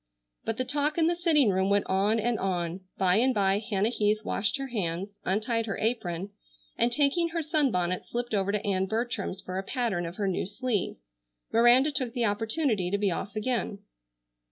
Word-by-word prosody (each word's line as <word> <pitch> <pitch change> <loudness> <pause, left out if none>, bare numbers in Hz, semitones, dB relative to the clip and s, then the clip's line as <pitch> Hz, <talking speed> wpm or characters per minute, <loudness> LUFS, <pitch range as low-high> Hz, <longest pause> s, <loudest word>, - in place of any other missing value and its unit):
But 225 - -2
the 255 - -1
talk 290 +3 0
in 330 - +3
the 340 +1 +2
sitting 310 - +3
room 190 +1 +1
went 200 0 +2
on 200 +4 +2
and 230 0 0
on. 180 -2 -2 0.2
By 185 0 +3
and 255 +2 +3
by 195 -1 +3
Hannah 210 -1 0
Heath 210 -2 +2
washed 200 +3 0
her 270 -1 -5
hands, 200 -2 -3
untied 225 +4 0
her 200 - -2
apron, 200 -5 -2 0.4
and 240 - +2
taking 295 +6 +2
her 330 0 -2
sunbonnet 245 - 0
slipped 240 -1 -3
over 200 -1 +1
to 210 +1 -2
Ann 190 -1 +1
Bertram's 220 -3 -2
for 185 +1 -4
a - - -4
pattern 205 -7 -1
of 170 - -7
her 205 -2 -1
new 185 -1 -1
sleeve. 210 -1 -2 0.6
Miranda 240 +5 +6
took 260 -4 -2
the 240 -2 0
opportunity 220 - 0
to 200 - 0
be 200 -2 +1
off 200 +4 -4
again. 215 -2 -1
215 Hz, 190 wpm, -28 LUFS, 195-250 Hz, 0.6 s, Miranda